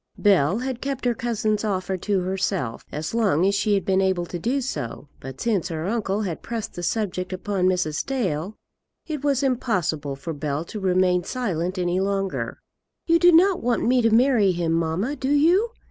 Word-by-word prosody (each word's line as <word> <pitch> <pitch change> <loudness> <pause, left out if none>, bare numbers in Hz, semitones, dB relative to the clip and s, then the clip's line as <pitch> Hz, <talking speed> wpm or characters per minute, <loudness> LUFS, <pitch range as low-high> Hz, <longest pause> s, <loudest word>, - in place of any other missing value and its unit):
Bell 190 -3 +3
had 255 0 -4
kept 270 -2 -3
her 245 - +3
cousin's 220 -3 -1
offer 190 -3 -1
to 190 +1 -1
herself 185 - -2
as 155 +5 -4
long 200 -7 +2
as 200 - +3
she 205 +1 +2
had 195 - -1
been 190 0 +2
able 190 -2 +1
to 175 0 -6
do 250 +10 0
so; 145 - -5
but 135 0 -9
since 215 -7 0
her 160 -1 -4
uncle 210 -1 -1
had 175 -5 -4
pressed 230 -2 -5
the 175 - -6
subject 185 -1 -2
upon 185 0 -1
Mrs. 180 -5 0
Dale, 200 - -2 0.5
it 300 -3 -5
was 280 -1 +1
impossible 185 - -1
for 140 +4 -6
Bell 150 +1 -3
to 215 - -7
remain 185 -1 +2
silent 185 -5 -2
any 180 0 0
longer. 195 0 -2 0.5
"You 335 0 +4
do 350 +1 +7
not 360 +3 +5
want 240 0 0
me 250 +1 +3
to 230 - +3
marry 225 -3 +4
him, 170 -1 -1
mamma; 165 - 0
do 265 -2 -3
you?" 340 +10 +4
195 Hz, 190 wpm, -24 LUFS, 175-240 Hz, 0.5 s, do